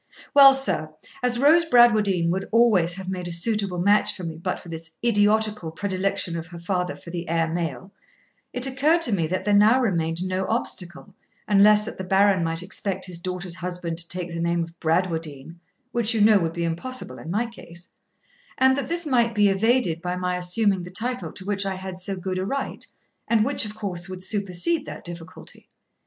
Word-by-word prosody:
Well, 275 -2 +9
sir, 155 -13 -1 0.3
as 250 -1 +1
Rose 305 +6 +5
Bradwardine 215 - +4
would 190 +2 -3
always 210 -7 +3
have 190 -1 -8
made 185 -2 -4
a - - -5
suitable 195 +1 -1
match 200 +4 +3
for 185 - -8
me 165 -2 -5
but 180 +2 -3
for - - -14
this 165 0 -8 0.2
idiotical 210 -4 +2
predilection 190 0 -2
of 165 0 -5
her 175 0 -10
father 180 +1 -2
for 170 - -12
the 170 -1 -5
heir 165 0 +1
male, 170 - -4 0.6
it 250 +1 0
occurred 295 +6 +2
to 240 - +1
me 170 -6 +1
there 185 +4 -1
now 215 +5 +5
remained 170 -7 -1
no 185 0 -2
obstacle 190 -4 -3 0.3
unless 210 +1 +5
that 220 - -7
the - - -3
Baron 190 -1 +3
might 165 +1 -2
expect 190 0 -4
his 180 -2 -6
daughter's 180 0 -4
husband 175 -2 -4
to 170 - -6
take 180 -1 -4
the 170 0 -5
name 170 0 0
of 165 0 -11
Bradwardine 165 -2 -2 0.3
(which 235 -1 +1
you 220 - +1
know 210 -1 +6
would 165 -2 -2
be 170 - -3
impossible 175 +11 -4
in - - -9
my 210 +7 0
case), 175 -7 -12 0.7
and 265 0 +4
that 275 -1 -3
this 340 0 +1
might 235 -5 +2
be 205 -1 +4
evaded 195 -4 +1
by 180 0 -3
my 180 0 -2
assuming 185 +2 +1
the 175 - -8
title 245 +7 -2
to 190 - -8
which 200 0 -1
I 195 -1 -2
had 185 -1 -7
so 195 +1 -4
good 185 0 -4
a - - -1
right, 275 +4 -4 0.4
and 220 -2 +3
which, 275 -3 +1
of 210 0 -7
course, 185 -4 -4
would 185 0 -6
supersede 200 - -1
that - - -8
difficulty. 175 +1 -10
190 Hz, 200 wpm, -24 LUFS, 170-220 Hz, 0.7 s, Well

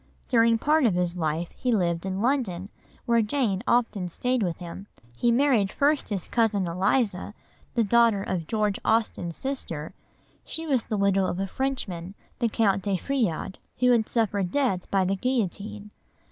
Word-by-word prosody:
During 230 -2 +4
part 300 +2 +3
of 195 - +1
his 175 -1 0
life 160 0 -2
he 250 - -1
lived 175 -4 0
in 190 +2 -2
London, 215 -8 0 0.4
where 235 -1 +3
Jane 215 -4 0
often 225 -6 +1
stayed 250 +7 -1
with 175 -4 -1
him. 180 +3 -8 0.3
He 240 - +2
married 235 -6 +3
first 290 +1 +1
his 195 -5 -3
cousin 220 -5 +1
Eliza, 195 +3 0 0.4
the 235 - +3
daughter 225 -2 +3
of 175 -5 -3
George 210 -3 0
Austen's 215 -7 0
sister; 170 - -4 0.5
she 325 - -5
was 265 -7 +1
the 215 - -2
widow 195 -1 +2
of 175 - -3
a 195 - 0
Frenchman, 195 -7 -3 0.2
the 235 -2 +1
Count 200 -3 +2
de 195 -1 0
Feuillade, 200 - -2 0.2
who 250 0 +4
had 230 -3 +2
suffered 205 -5 0
death 235 -6 0
by 195 -1 +2
the 195 +2 +1
guillotine. 210 -2 -2
205 Hz, 165 wpm, -26 LUFS, 185-240 Hz, 0.5 s, During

